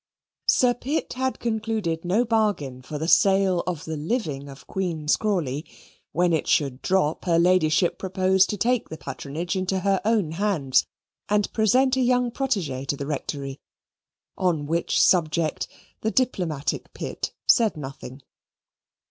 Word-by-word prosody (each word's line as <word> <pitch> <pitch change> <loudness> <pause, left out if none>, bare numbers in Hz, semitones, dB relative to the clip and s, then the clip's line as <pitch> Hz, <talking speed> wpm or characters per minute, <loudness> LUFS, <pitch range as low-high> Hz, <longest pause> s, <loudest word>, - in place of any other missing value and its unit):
Sir 250 -1 +4
Pitt 275 +6 -3
had 260 +1 -1
concluded 220 -7 -2
no 200 +8 +2
bargain 205 - 0
for 150 +4 -6
the 160 +2 -3
sale 190 -1 +4
of 170 -4 -3
the 160 - -4
living 150 - -3
of 135 0 -12
Queen's 165 -5 0
Crawley; 160 -10 -1 0.5
when 175 0 +2
it 160 - 0
should 135 -3 +1
drop, 185 -5 0
her 170 -2 +3
Ladyship 175 -1 +3
proposed 190 0 +2
to 210 - -2
take 245 +3 +1
the 160 - -7
patronage 160 +6 -5
into 190 0 -1
her 195 -1 +1
own 210 -7 +1
hands 165 -7 +1 0.4
and 210 0 +1
present 255 +4 +3
a - - +2
young 250 -1 +2
protege 195 - -2
to 140 - -2
the 140 - -4
Rectory, 140 -1 -4 0.8
on 170 -6 0
which 165 +3 0
subject 160 -3 +2 0.3
the 220 - 0
diplomatic 180 - -1
Pitt - - -4 0.2
said 225 -8 +4
nothing. 135 -1 -8
180 Hz, 145 wpm, -24 LUFS, 155-215 Hz, 0.8 s, Sir